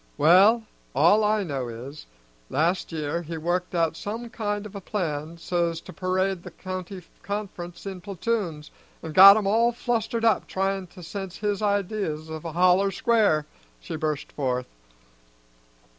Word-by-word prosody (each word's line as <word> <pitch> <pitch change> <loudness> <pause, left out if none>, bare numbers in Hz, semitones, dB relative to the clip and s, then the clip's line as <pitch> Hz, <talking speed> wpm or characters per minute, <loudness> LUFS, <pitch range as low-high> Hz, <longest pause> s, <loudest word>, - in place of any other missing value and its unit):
"Well, 195 +9 +6 0.3
all 170 +10 +5
I 210 0 +2
know 135 -7 -3
is, 125 +6 -9 0.4
last 170 +5 0
year 160 +1 -2
he 165 0 -6
worked 175 +3 -2
out 165 -1 +1
some 225 +6 -6
kind 205 -2 -3
of 210 - -9
plan 165 -5 -3
so's 170 -1 -1
to - - -11
parade 185 0 -1
the - - -9
county 185 0 -7 0.2
conference 200 -4 -6
in 190 -2 -6
platoons, 185 -5 -3 0.3
and 160 -1 -6
got 195 +3 +10
'em 215 - -1
all 230 +4 +3
flustered 230 -1 -1
up 225 - +2
tryin' 195 0 -1
to 180 +1 -13
sense 190 +1 -6
his 205 -1 -1
ideas 200 -6 -1
of 160 +1 -7
a 165 - -5
holler 185 +3 +4
square," 200 -8 +2 0.3
she - - -6
burst 155 -2 -3
forth. 125 -3 -2
185 Hz, 150 wpm, -25 LUFS, 160-205 Hz, 0.4 s, got